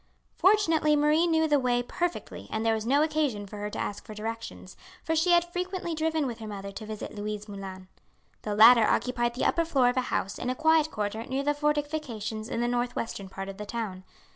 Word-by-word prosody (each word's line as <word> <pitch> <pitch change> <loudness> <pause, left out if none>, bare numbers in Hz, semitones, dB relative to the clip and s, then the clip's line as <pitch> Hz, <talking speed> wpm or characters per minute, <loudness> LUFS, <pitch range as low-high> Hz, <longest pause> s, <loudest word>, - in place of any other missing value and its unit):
Fortunately 330 -6 +4
Marie 300 +3 +3
knew 320 -1 +3
the 295 -2 +3
way 245 -1 +1
perfectly 350 +7 -4
and 220 +1 -2
there 225 - +3
was 220 0 -3
no 285 +4 +4
occasion 300 -10 0
for 210 +1 -9
her 205 0 -4
to - - -7
ask 205 - -4
for 215 - -10
directions, 225 -3 -6 0.3
for 320 - 0
she 325 +3 +2
had 345 0 +5
frequently 360 -1 -3
driven 315 -1 0
with 240 -4 -4
her 220 - -7
mother 200 -1 -6
to 215 +2 -8
visit 215 -1 -6
Louise 210 0 -5
Moulin. 190 -2 -8 0.5
The 210 -1 -3
latter 230 +2 +8
occupied 240 -1 0
the 255 - -1
upper 335 - +3
floor 270 -7 +3
of 245 - -2
a - - +4
house 195 - -2
in 250 - -2
a 255 - -1
quiet 315 +1 +3
quarter 215 -2 -3
near 270 +1 -1
the 290 +1 +2
fortifications 290 -7 -2
in 230 - -2
the 240 - +1
north 245 0 -1
western 200 -4 -4
part 195 0 -6
of 195 0 -7
the 210 - -6
town. 205 -5 -4
245 Hz, 220 wpm, -28 LUFS, 210-310 Hz, 0.5 s, latter